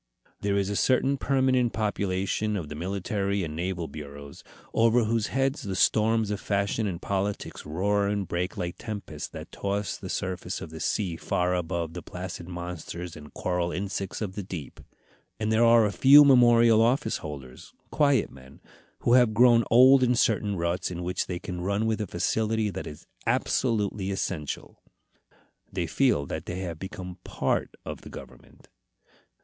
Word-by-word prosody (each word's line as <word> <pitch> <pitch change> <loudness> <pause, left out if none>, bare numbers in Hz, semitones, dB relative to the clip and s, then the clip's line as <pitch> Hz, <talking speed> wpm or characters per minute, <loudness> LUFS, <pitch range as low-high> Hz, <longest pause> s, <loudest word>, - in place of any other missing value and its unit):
There 100 0 0
is 100 0 0
a - - -2
certain 130 +5 +2
permanent 130 -3 +2
population 105 0 -1
of 80 -6 -5
the 75 - -6
military 100 +3 -2
and 75 -2 -5
naval 85 0 -3
bureaus, 70 -2 -10 0.3
over 115 +1 +4
whose 110 -1 0
heads 135 +2 0
the 95 -2 -4
storms 110 +2 +2
of 100 - -3
fashion 100 +2 0
and 90 -4 -4
politics 100 -3 -3
roar 100 +6 +1
and 100 -2 -1
break 90 +3 -3
like 90 -2 -4
tempests 105 -3 -6
that - - -9
toss 100 -1 -2
the - - -8
surface 90 -1 -3
of 80 - -8
the 80 - -8
sea 90 -3 -1
far 90 +1 0
above 85 -2 -2
the 90 - -6
placid 90 -1 -7
monsters 90 -1 -6
and 75 0 -12
coral 90 -1 -1
insects 100 +2 -3
of 95 -3 -4
the 105 - -4
deep. 90 -6 -8 0.6
And 110 0 -1
there 110 +1 +4
are 115 -1 +6
a 105 - 0
few 145 +6 +8
memorial 120 -4 +6
office 125 +6 +2
holders 70 -4 -9 0.2
quiet 140 -6 +2
men, 65 +1 -15 0.4
who 120 - +3
have 120 -4 +5
grown 120 0 +6
old 130 +3 +7
in 125 -1 +3
certain 105 -3 +1
ruts 85 +1 -1
in 90 -1 -5
which 90 +1 -2
they 90 - -3
can 90 0 -6
run 100 +4 0
with 110 -1 0
a 105 - -3
facility 110 +4 0
that - - -6
is 75 - -10 0.2
absolutely 105 -5 0
essential. 90 -6 -4 0.9
They - - -2
feel 70 - +2
that - - -6
they 90 +2 -4
have 85 -4 -5
become 95 -1 -7
part - - -1
of - - -6
the - - -11
government. - - -13
100 Hz, 170 wpm, -27 LUFS, 90-110 Hz, 0.9 s, few